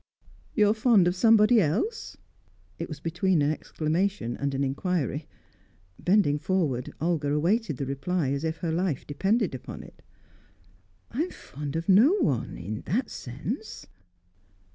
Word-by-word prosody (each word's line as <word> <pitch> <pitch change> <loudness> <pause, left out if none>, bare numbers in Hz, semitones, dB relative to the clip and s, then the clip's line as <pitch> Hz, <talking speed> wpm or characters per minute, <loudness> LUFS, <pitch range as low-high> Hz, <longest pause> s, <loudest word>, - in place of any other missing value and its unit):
"You 210 -3 +5
are 210 - +4
fond 215 -5 +4
of 175 - +1
somebody 220 +2 +5
else?" 215 - -1 0.6
It - - -4
was 155 -3 -7
between 175 0 +1
an 145 - +2
exclamation 155 - -1
and 140 -1 -2
an 135 - 0
inquiry. 145 +1 -1 0.7
Bending 180 -6 +3
forward, 145 -7 -1
Olga 155 -3 0
awaited 165 - +1
the 140 - -3
reply 140 +3 -1
as 140 +2 -2
if 160 0 -2
her 165 - 0
life 170 -4 -1
depended 195 - 0
upon 130 - -7
it. - - -16 1.1
"I 250 - -1
am 350 - -1
fond 145 +1 -7
of 165 +1 -3
no 215 - +6
one 185 - 0
in 105 +5 -5
that 225 - -1
sense." 175 - -6
170 Hz, 145 wpm, -27 LUFS, 145-205 Hz, 1.1 s, no